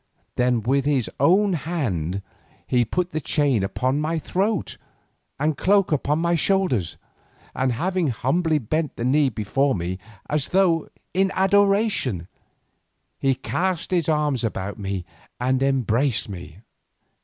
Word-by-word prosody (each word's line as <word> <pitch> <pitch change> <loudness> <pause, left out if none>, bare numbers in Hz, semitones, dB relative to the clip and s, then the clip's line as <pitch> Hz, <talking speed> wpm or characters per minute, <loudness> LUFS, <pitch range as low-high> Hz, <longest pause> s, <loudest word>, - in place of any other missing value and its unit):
Then 125 -2 +1
with 135 +3 +1
his 140 -5 +1
own 190 +8 +4
hand, 105 - -2 0.4
he 125 -1 +2
put 180 +10 -2
the 155 - -2
chain 140 -5 +2
about 105 +7 -1
my 155 +3 0
throat, 190 +4 -1 0.6
and 150 +2 +2
the - - -7
cloak 195 -2 +3
upon 150 0 +1
my 170 +1 +1
shoulders, 170 - +1 0.6
and 130 -1 0
having 180 +6 0
humbly 155 +6 +1
bent 150 +4 -2
the 120 - -3
knee 140 +2 +3
before 130 +6 0
me 90 +1 -3 0.3
as 150 -2 -1
though 180 -4 +2 0.2
in 190 +1 +2
adoration, 195 - +2 0.9
he 135 -1 +2
cast 180 +5 -2
his 170 -3 +1
arms 150 -5 +1
about 100 -2 -3
me 95 -3 -3 0.3
and 130 +1 +1
embraced 135 -2 +1
me. 90 -2 -9
140 Hz, 135 wpm, -23 LUFS, 120-175 Hz, 0.9 s, own